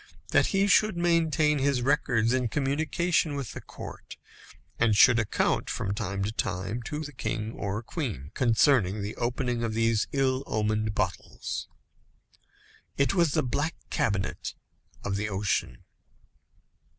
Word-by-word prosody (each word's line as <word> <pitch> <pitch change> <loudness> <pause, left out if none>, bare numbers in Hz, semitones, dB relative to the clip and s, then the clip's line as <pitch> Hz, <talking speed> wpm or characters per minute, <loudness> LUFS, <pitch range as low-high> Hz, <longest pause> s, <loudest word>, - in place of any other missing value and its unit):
that - - +4
he 195 0 +2
should 215 -1 +4
maintain 160 -3 +2
his 135 -2 +1
records 125 -4 +2
in 130 -1 +1
communication 150 +4 0
with 135 -5 -4
the - - -7
court, - - -10 0.6
and 110 -3 +3
should 120 0 +7
account, 110 -2 0
from 100 - -2
time 100 -2 -3
to 105 - -1
time, 95 +2 -2
to 150 +5 -4
the 145 - -7
king 110 -1 -3
or 105 0 -4
queen, 110 - -4
concerning 115 -4 +3
the 105 - -4
opening 120 0 -1
of 110 -2 -2
these 115 -1 +2
ill 135 -1 +1
omened 110 0 0
bottles. 95 -3 -3 1.3
It 140 +6 +2
was 170 -6 +2
the - - +2
black 145 +6 -1 0.2
cabinet 100 -5 -1 0.5
of 100 -1 -1
the 105 +1 -2
ocean. 95 -11 -1
120 Hz, 140 wpm, -28 LUFS, 105-145 Hz, 1.3 s, should